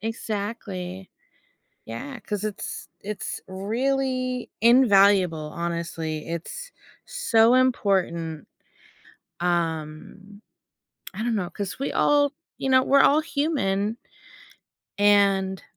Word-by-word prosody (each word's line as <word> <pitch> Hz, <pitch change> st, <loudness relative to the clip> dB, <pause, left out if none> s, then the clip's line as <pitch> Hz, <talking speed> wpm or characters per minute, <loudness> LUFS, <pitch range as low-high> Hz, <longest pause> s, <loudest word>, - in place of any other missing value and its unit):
Exactly, 200 Hz, -4 st, -5 dB, 0.8 s
yeah, 275 Hz, -3 st, -7 dB
‘cause 210 Hz, -2 st, -4 dB
it's 215 Hz, -2 st, -5 dB
it's 210 Hz, 0 st, -5 dB
really 255 Hz, +5 st, -1 dB
invaluable, 200 Hz, -9 st, +5 dB
honestly, 170 Hz, -2 st, -4 dB
it's 485 Hz, -, -6 dB, 0.3 s
so 225 Hz, +1 st, +3 dB
important. 185 Hz, -10 st, 0 dB, 0.9 s
Um, 170 Hz, +3 st, -3 dB, 0.7 s
I -, -, -9 dB
don't 235 Hz, 0 st, 0 dB
know, 180 Hz, -3 st, -2 dB
'cause 200 Hz, +2 st, -5 dB
we 275 Hz, -, -2 dB
all 290 Hz, -1 st, +3 dB, 0.3 s
you 270 Hz, -, -2 dB
know, 260 Hz, 0 st, +6 dB
we're 280 Hz, 0 st, +4 dB
all 290 Hz, +3 st, +5 dB
human. 245 Hz, -10 st, -1 dB, 1.0 s
And 200 Hz, -2 st, +3 dB
205 Hz, 90 wpm, -25 LUFS, 180-255 Hz, 1.0 s, know